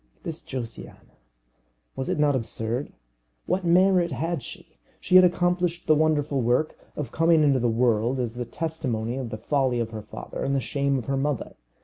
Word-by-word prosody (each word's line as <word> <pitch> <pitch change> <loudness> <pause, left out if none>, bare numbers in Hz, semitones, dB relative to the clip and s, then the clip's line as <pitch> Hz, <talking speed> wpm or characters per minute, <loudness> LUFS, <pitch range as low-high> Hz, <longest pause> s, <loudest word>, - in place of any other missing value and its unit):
This 160 -1 -5
Josiana! 120 -4 -8 0.8
Was 130 0 -3
it - - 0
not 145 -2 +3
absurd? 115 +2 -3 0.5
What 190 - 0
merit 180 0 +4
had 160 +4 -2
she? - - -10 0.2
She 185 - 0
had 185 - +10
accomplished 175 -1 +1
the 155 - +5
wonderful 150 -3 +1
work 125 +6 +1 0.2
of 135 -6 -4
coming 165 -1 +4
into 140 -3 +4
the 120 0 +1
world 115 +2 +1
as 120 -2 -2
a 120 - -3
testimony 125 -6 -3
of 130 -3 -4
the 110 - -5
folly 130 -2 0
of 115 -1 -2
her 110 -1 -6
father - - -7
and 140 - 0
the - - +2
shame 140 +2 0
of 125 - -4
her 135 0 -1
mother. 140 -1 -2
140 Hz, 185 wpm, -25 LUFS, 120-160 Hz, 0.8 s, had